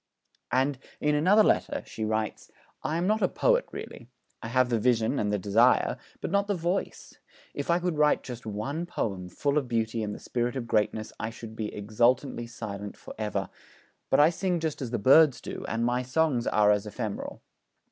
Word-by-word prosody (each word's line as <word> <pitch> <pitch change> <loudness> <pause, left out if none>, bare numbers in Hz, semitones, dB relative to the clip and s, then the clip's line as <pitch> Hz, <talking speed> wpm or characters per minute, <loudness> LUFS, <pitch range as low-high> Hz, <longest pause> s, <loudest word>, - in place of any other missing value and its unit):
And, 130 +1 +1 0.2
in 150 0 +1
another 185 +9 +5
letter, - - +1
she 110 - -6
writes: 110 0 -2 0.3
'I 160 - -1
am 175 - 0
not 215 +3 +2
a - - +4
poet - - +2
really. 120 - -8 0.3
I - - -5
have 130 +1 +2
the 115 -2 +1
vision 115 +2 +2
and 105 -1 0
the 105 - +1
desire, 105 +6 +3 0.3
but - - -3
not 200 +1 +2
the 205 - 0
voice. 175 +3 -3 0.3
If 145 - -5
I 170 - +4
could 175 -3 -2
write 150 0 +3
just 120 -3 -8
one 135 +11 -3
poem 95 - -3
full 145 - 0
of 135 - -6
beauty 115 -1 -1
and 105 -1 -3
the - - -9
spirit 120 +1 -2
of 130 -3 -3
greatness, 110 -1 0
I 115 - -2
should 110 -1 -10
be 110 -1 -4
exultantly 120 +4 +1
silent 105 -3 -7
for - - -10
ever; 100 -3 -2 0.6
but 135 - +4
I 150 +3 +6
sing 180 0 -1
just 160 -3 -3
as 130 - -3
the 120 - -1
birds 140 +5 +6
do, - - -7
and 115 +2 -1
my 120 +1 +1
songs 130 -1 +1
are 105 -1 +4
as 105 0 +1
ephemeral.' 105 -1 -5
120 Hz, 200 wpm, -28 LUFS, 110-150 Hz, 0.6 s, I